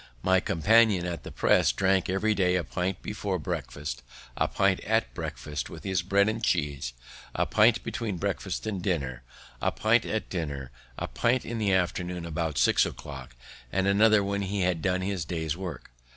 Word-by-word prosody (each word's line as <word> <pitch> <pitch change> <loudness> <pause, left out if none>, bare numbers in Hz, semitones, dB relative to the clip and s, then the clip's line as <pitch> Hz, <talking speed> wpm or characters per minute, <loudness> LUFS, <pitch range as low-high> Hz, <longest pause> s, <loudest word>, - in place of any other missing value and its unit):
My 95 0 +4
companion 100 +2 +3
at 85 -1 -4
the - - -9
press - - +3
drank 95 -1 +1
every 100 +3 +2
day 90 -3 +2
a 90 - +1
pint 90 +2 -3
before 100 -2 -2
breakfast, 75 -5 -4 0.3
a - - +1
pint - - +2
at - - 0
breakfast 75 0 -5
with - - -10
his 95 -3 0
bread 100 +3 +3
and 110 +1 -2
cheese, 70 - 0 0.4
a - - +2
pint 110 +2 +4
between 110 -6 -3
breakfast 95 -1 -3
and 100 -4 -3
dinner, 70 -10 -2 0.4
a - - +2
pint 110 +1 +3
at 110 - -2
dinner, 70 -7 -4 0.3
a - - -3
pint 120 +2 +1
in 115 0 -4
the 105 -2 +1
afternoon 90 -1 0
about 80 -2 -2
six - - +4
o'clock, 65 -4 -7 0.4
and 95 +1 +1
another 105 +1 +5
when 100 0 -1
he 100 0 -2
had 90 -2 +1
done 90 +1 +1
his 95 -2 -2
day's 80 -2 -2
work. 90 -10 -7
95 Hz, 180 wpm, -28 LUFS, 80-100 Hz, 0.4 s, another